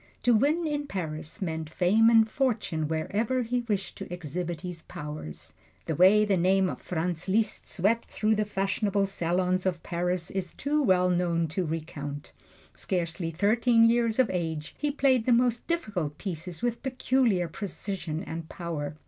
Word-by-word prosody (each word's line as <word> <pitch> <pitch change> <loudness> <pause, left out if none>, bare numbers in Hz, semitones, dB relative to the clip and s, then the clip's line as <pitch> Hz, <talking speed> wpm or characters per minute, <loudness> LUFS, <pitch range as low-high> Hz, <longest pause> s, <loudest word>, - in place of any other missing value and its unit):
To 245 - +5
win 295 +9 +2
in 295 -2 -2
Paris 160 - -4
meant 160 -3 -3
fame 200 +7 +4
and 225 -1 +6
fortune 215 - -1
wherever 215 +11 0
he 245 +2 -1
wished 195 -4 -2
to - - -8
exhibit 175 0 -4
his 180 -2 -6
powers. 85 - -8 0.3
The 160 - -1
way 195 +7 +6
the 200 -2 +2
name 190 +2 +3
of - - -8
Franz 175 0 -2
Liszt 215 +2 +1
swept 220 +6 0
through 215 0 +1
the 215 0 +1
fashionable 200 0 0
salons 185 0 0
of 175 -3 -2
Paris 175 0 -2
is 185 -2 -3
too 300 +2 0
well 180 -7 +3
known 170 -2 +1
to 175 +2 -2
recount. 145 -3 -5 0.4
Scarcely 170 -1 -2
thirteen 230 +6 +4
years 230 -1 +2
of 260 -3 +3
age, 160 -3 -3
he 295 - 0
played 265 -4 +2
the 250 - +5
most 240 0 +2
difficult 200 - -2
pieces 175 -1 -6
with 240 -1 -1
peculiar 255 -8 +1
precision 180 -2 -5
and 165 -3 -6
power. 155 -4 -4
185 Hz, 160 wpm, -28 LUFS, 165-225 Hz, 0.4 s, and